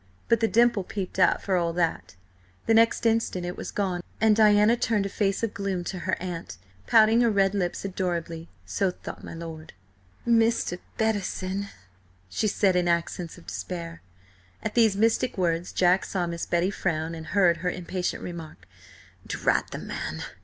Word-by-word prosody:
But 230 - +4
the 225 - +2
dimple 235 -2 +3
peeped 190 0 -5
out 185 - +4
for 195 - +1
all 170 -1 0
that 160 - -1 0.5
The 225 - +3
next 230 +1 +4
instant 225 -5 +1
it 175 +1 -4
was - - -6
gone, 185 -3 -1 0.2
and 220 -1 +5
Diana 210 +1 +5
turned 225 -4 0
a - - -2
face 195 +1 -1
of 225 - -1
gloom 195 -3 -2
to 180 +1 -5
her - - +1
aunt, 170 - -6 0.3
pouting 225 +1 +6
her 235 - +4
red 195 -2 +2
lips 185 -1 -2
adorably, 170 -3 -3 0.2
so 95 - 0
thought 180 - -9
my - - -8
lord. 160 -1 -8 0.5
"Mr. 230 -6 +2 0.2
Bettison," 200 -2 -1 0.6
she 215 - 0
said 195 -2 +2
in 180 -1 +2
accents 170 0 -1
of 175 - -15
despair. 170 -2 -6 0.6
At - - -2
these 220 -4 +4
mystic 225 +2 +1
words, 170 -1 0
Jack 180 +1 +3
saw 180 -3 -1
Miss 170 -1 -4
Betty 175 +3 +1
frown, 165 -4 -2
and 160 0 -8
heard 175 -1 +3
her 180 - -1
impatient 180 0 -3
remark: 170 -3 -8 0.6
"Drat - - 0
the - - -6
man!" - - -5
185 Hz, 170 wpm, -26 LUFS, 170-210 Hz, 0.6 s, pouting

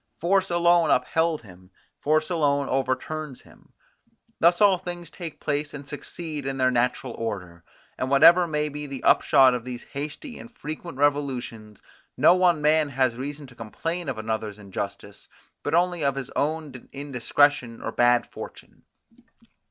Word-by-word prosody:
Force 190 +3 +2
alone 170 -1 +3
upheld 160 -3 +1
him, 90 -2 -16 0.3
force 155 +2 +1
alone 145 -4 +1
overturns 135 +2 -2
him. - - -21 0.7
Thus 175 +1 +4
all 200 -3 +5
things 175 -2 -7
take 165 -4 -8
place 145 0 -2
and 145 -1 -9
succeed 150 0 -6
in 135 0 -3
their 130 -1 +3
natural 125 0 0
order; 90 -7 -6 0.4
and 130 - -1
whatever 170 +6 +7
may 150 -1 -1
be 150 0 -6
the 135 -2 -7
upshot 130 -1 +5
of 125 -2 -3
these 125 -1 -7
hasty 150 - -6
and 235 - -11
frequent 155 0 -7
revolutions, 130 -7 -1 0.3
no 155 +6 +6
one 175 -4 +3
man 155 0 +3
has 130 -3 +1
reason 145 +3 -6
to 125 -3 -16
complain 165 +9 -4
of 130 - -3
another's 110 -1 -3
injustice, 100 0 -7 0.3
but - - -1
only 175 -1 +1
of 140 -1 +1
his 135 -2 -5
own 150 -4 -3
indiscretion 140 -2 +1
or - - -4
bad 120 0 +3
fortune. - - -11
145 Hz, 150 wpm, -25 LUFS, 125-160 Hz, 0.7 s, whatever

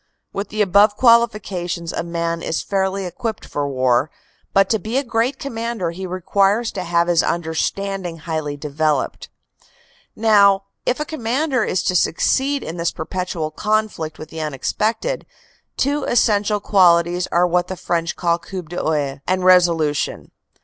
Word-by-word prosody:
With 200 +1 -4
the 215 0 +1
above 205 +2 +4
qualifications 200 -8 +2
a - - -1
man 170 0 -3
is 165 - -2
fairly 195 0 -1
equipped 215 +5 -5
for 145 -1 -3
war, 130 +1 +2 0.4
but 195 0 +4
to 220 - +2
be 225 +5 -3
a 275 - +1
great 240 +2 0
commander 230 -9 -3
he 185 +2 -6
requires 195 +5 +1
to 185 - -4
have 170 0 +1
his 175 -2 +4
understanding 175 +2 -2
highly 155 -3 -4
developed. 150 -1 -1 0.9
Now, 200 -3 +4 0.2
if 250 - +1
a 300 - -2
commander 265 -1 -1
is 185 - -1
to 185 - 0
succeed 270 - +1
in 165 - -6
this 170 0 0
perpetual 170 -2 -4
conflict 210 -4 -1
with 155 - -9
the 160 0 -6
unexpected, 215 - -2 0.5
two 285 +1 0
essential 210 -3 +2
qualities 175 -3 +3
are 175 +1 +2
what 180 0 +1
the 185 - -5
French 170 -1 -2
call 170 -1 +1
coup 185 +1 -7
d 175 +2 -9
oeil 145 -3 -1
and 185 0 +1
resolution. 170 -5 +2
185 Hz, 150 wpm, -20 LUFS, 165-215 Hz, 0.9 s, above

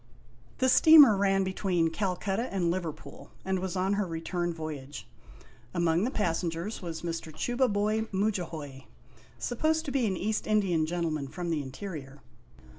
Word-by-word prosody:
The 260 - +2
steamer 290 -3 +8
ran 195 0 +2
between 185 -3 0
Calcutta 195 +5 -2
and 180 -3 +1
Liverpool, 170 -4 -6 0.2
and 190 0 0
was 190 0 -4
on 190 +2 +1
her 200 -1 0
return 175 +1 -2
voyage. 150 -7 -7 0.7
Among 170 +2 +2
the - - 0
passengers 175 -2 -2
was 165 -3 -6
Mr. 165 -1 -4
Chubaiboy 220 - 0
Mudjahoy, 165 -9 -3 0.5
supposed 315 +6 0
to 280 - -3
be 260 -5 +1
an 190 -2 -1
East 215 +4 -2
Indian 190 -7 +2
gentleman 160 -4 -2
from 175 +4 -4
the 155 -2 0
in 135 -2 -8
terior. 145 -4 -7
185 Hz, 145 wpm, -29 LUFS, 165-210 Hz, 0.7 s, steamer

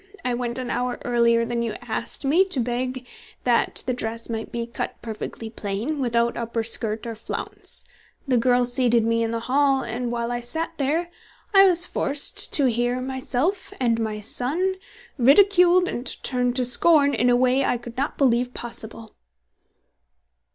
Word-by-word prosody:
I 250 - 0
went 240 0 -3
an 255 -1 -4
hour 250 0 -2
earlier 235 -1 +3
than 235 0 -2
you 230 -2 -2
asked 235 +3 -3
me, 320 +8 +4
to 365 -8 -1
beg 250 +1 -3 0.4
that 240 -2 +1
the 255 - -1
dress 230 -1 -4
might 225 -1 -5
be 235 0 -3
cut 235 - -6
perfectly 225 0 -6
plain, 220 +8 -3
without 235 -2 +1
upper 230 -1 -3
skirt 220 -1 -2
or 230 - -4
flounce. 225 - -4 0.4
The 255 -2 +2
girl 245 +1 +3
seated 240 -2 +2
me 230 0 +1
in 230 - 0
the 230 0 -3
hall, 270 +2 +2
and 235 +1 -4
while 235 0 -2
I 240 - -2
sat 320 +8 0
there, 320 +6 -1 0.4
I 390 0 +8
was 355 -2 +6
forced 285 -4 -1
to 285 - +4
hear 245 +1 0
myself 265 +9 -2
and 230 -3 +1
my 215 -1 -3
son 325 - -1 0.4
ridiculed 360 +6 +5
and 245 -5 -4 0.2
turned 250 -1 0
to 250 -1 +2
scorn 285 +3 +5
in 240 +2 +2
a 245 - +4
way 255 +2 +2
I 245 - +1
could 235 0 -10
not 275 +3 -2
believe 250 -2 +1
possible. 225 -1 -6
245 Hz, 170 wpm, -23 LUFS, 235-270 Hz, 0.4 s, I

